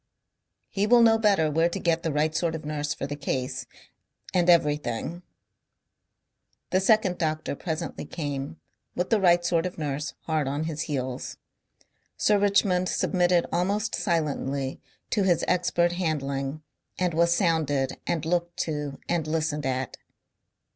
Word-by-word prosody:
"He 205 0 0
will 240 +1 +6
know 225 -1 +5
better 195 -8 +3
where 165 +3 +3
to - - -4
get 165 -1 +1
the 165 -2 -1
right 150 +2 +1
sort 165 0 0
of 155 - -7
nurse 150 -1 -2
for - - -3
the 145 +1 -4
case 130 -3 -3 0.7
and 180 -1 +3
everything." 150 -1 +1 1.5
The 185 - +3
second 195 -3 +3
doctor 155 -3 -1
presently 160 +1 -4
came, 145 -1 -5 0.4
with 180 +1 -2
the 220 -3 +4
right 175 -1 +4
sort 170 0 +2
of 180 - -9
nurse 150 -1 -3
hard 155 -3 -1
on 145 +3 -1
his 160 -1 -3
heels. 130 -3 -3 0.8
Sir 210 -1 +3
Richmond 195 -3 +2
submitted 180 -2 +2
almost 200 +5 0
silently 140 -6 -1 0.3
to 210 - +2
his 180 -4 +2
expert 175 -1 +2
handling 150 -4 -2 0.3
and 180 -2 0
was 170 +1 +3
sounded 155 -7 +1
and 160 -2 -1
looked 175 +1 -1
to 150 -3 -3
and 170 -3 0
listened 155 -2 -1
at. 130 0 -2
160 Hz, 145 wpm, -26 LUFS, 145-180 Hz, 1.5 s, will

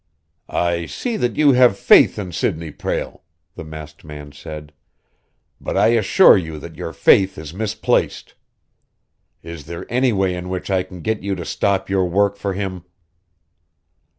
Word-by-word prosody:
"I 85 -1 -1
see 240 -3 -4
that 120 -1 -1
you 150 -2 +5
have 125 -5 +4
faith - - +5
in 95 -4 -5
Sidney 80 -1 -2
Prale," - - -4 0.3
the - - -8
masked 75 -1 -10
man 75 -1 -10
said. 75 +1 -10 0.9
"But - - -4
I - - +4
assure 115 - +6
you 80 -5 -3
that 80 +2 -10
your 80 - -6
faith 95 +6 +3
is 80 0 -8
misplaced. 110 +2 -1 1.1
Is 85 -3 -9
there 85 0 -7
any 125 0 +3
way 95 -3 0
in 90 0 -6
which 95 +1 -4
I 95 -1 +2
can 90 -1 -10
get 110 +2 -2
you 100 0 -2
to 85 -2 -7
stop 100 -1 0
your 95 -1 +1
work 100 +2 +2
for 100 -1 -3
him?" 95 -3 -4
90 Hz, 160 wpm, -20 LUFS, 80-100 Hz, 1.1 s, assure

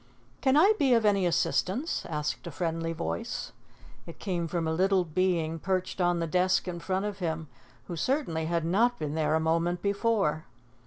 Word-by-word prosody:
"Can 265 +1 +3
I 390 +8 +6
be 265 -3 +4
of 230 -2 +2
any 200 -3 +3
assistance?" 185 - 0
asked 150 +1 -3
a - - -5
friendly 165 +2 -2
voice. 85 - -4 0.6
It 170 - -9
came 175 -4 -2
from 165 0 -2
a 160 - 0
little 190 +1 +2
being 165 -1 0
perched 185 +1 -2
on 175 0 +2
the 165 - 0
desk 185 +3 +1
in 175 -1 -4
front 190 +3 -1
of 205 -1 -4
him, 160 -4 -3 0.4
who 175 - -5
certainly 170 - -1
had 165 0 0
not 230 +8 +2
been 150 -1 -3
there 155 -1 +1
a - - +3
moment 165 +2 0
before. 200 -6 +1
175 Hz, 180 wpm, -28 LUFS, 160-195 Hz, 0.6 s, I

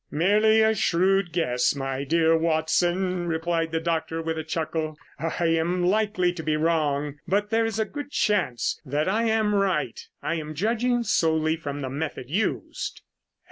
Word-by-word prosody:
"Merely 210 +7 +4
a 220 0 +4
shrewd 190 -1 +2
guess, 135 -7 +1
my 135 0 -3
dear 165 +2 +3
Watson," 175 +3 +1
replied 165 0 -1
the 165 - 0
doctor 165 0 -2
with 165 0 -2
a 160 - -4
chuckle. 160 -1 -3 0.2
"I 165 +2 -1
am 165 +2 +1
likely 200 -2 +1
to 170 - -6
be 155 -1 0
wrong, 150 -3 0
but 205 +4 0
there 225 0 +2
is 220 -1 -3
a 220 - +1
good 290 +4 -7
chance 195 - 0
that 145 +4 -1
I 220 +5 +1
am 220 -2 +2
right. 185 - 0 0.2
I 165 - -2
am 155 0 -7
judging 235 +6 +1
solely 160 -5 +2
from 145 -3 -5
the 130 - -3
method 145 -2 -5
used." 205 +6 -2
165 Hz, 165 wpm, -25 LUFS, 155-195 Hz, 0.2 s, Merely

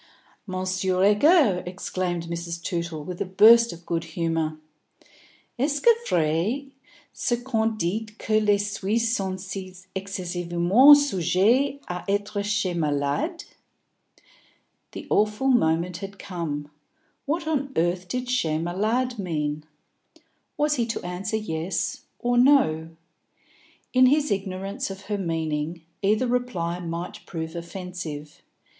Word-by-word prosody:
"Monsieur 185 0 0
Egger," 210 - +5
exclaimed 180 -2 -3
Mrs. 170 0 -5
Tootle, 170 -4 -3
with 180 +3 -6
a - - +1
burst 230 +5 +6
of 170 0 -11
good 165 -1 -1
humour, 165 -2 -2 1.0
"est 285 +2 0
ce 470 - +9 0.2
vrai 180 - 0 0.4
ce 240 - 0
qu'on 225 -3 0
dit 215 +4 -3
que 215 -1 +1
les 210 -1 +3
Suisses 210 +3 0
sont 190 -3 -2
si 190 0 -6 0.2
excessivement 185 +6 +4
sujets 255 - +2
a 180 0 -4
etre 205 +1 -1
chez 205 -2 0
malades?" 155 - -1 1.5
The - - -7
awful 210 +5 +2
moment 170 -7 +2
had 195 +2 -8
come. 150 -7 -5 0.6
What 325 +3 -1
on 280 -3 -1
earth 175 +2 0
did 250 +6 -3
chez 165 -12 +1
malades 215 +9 -1
mean? 150 -5 -2 0.9
Was 295 0 +2
he 235 -2 0
to 225 - -4
answer 185 +5 -2
yes 180 -1 -3
or 245 0 +1
no? 245 - +4 1.0
In 255 0 +6
his 295 +2 +2
ignorance 195 0 -3
of 195 0 -7
her 205 0 -3
meaning, 160 -2 -2 0.2
either 215 +5 +2
reply 240 -9 -1
might 170 0 -5
prove 160 -1 -5
offensive. 170 -4 -7
190 Hz, 120 wpm, -25 LUFS, 170-225 Hz, 1.5 s, ce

